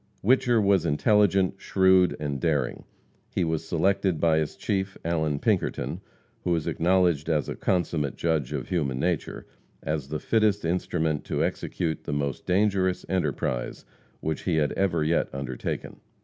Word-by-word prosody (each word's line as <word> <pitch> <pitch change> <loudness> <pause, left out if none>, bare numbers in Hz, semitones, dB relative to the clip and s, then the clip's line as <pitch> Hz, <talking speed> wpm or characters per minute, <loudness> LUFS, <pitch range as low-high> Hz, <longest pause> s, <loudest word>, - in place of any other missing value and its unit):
Whicher 120 +1 +4
was 100 -4 +3
intelligent, 95 +3 +2
shrewd 95 -2 +4
and 70 -2 -3
daring. 70 -5 -1 0.4
He - - -1
was 80 -1 -2
selected 95 0 +1
by 80 -2 +3
his 75 - -2
chief, 95 -1 -2
Allan 80 -3 0
Pinkerton, - - -1 0.4
who 85 - +1
is 80 -2 -2
acknowledged 85 -3 +2
as 75 -3 +1
a - - -3
consummate 85 -6 -1
judge 80 -6 -1
of 70 -3 -4
human 70 -8 -1
nature, 85 0 -2 0.4
as 75 -3 -2
the 75 +2 -3
fittest 105 0 +1
instrument 80 -3 -1
to - - -1
execute 80 -2 -3
the - - -3
most 70 -2 -3
dangerous 95 -1 +1
enterprise 75 -8 -2 0.4
which 80 -2 -3
he 90 - +1
had 75 -2 +2
ever 85 -5 +1
yet 80 +2 +1
undertaken. 65 -2 -5
85 Hz, 150 wpm, -26 LUFS, 75-95 Hz, 0.4 s, Whicher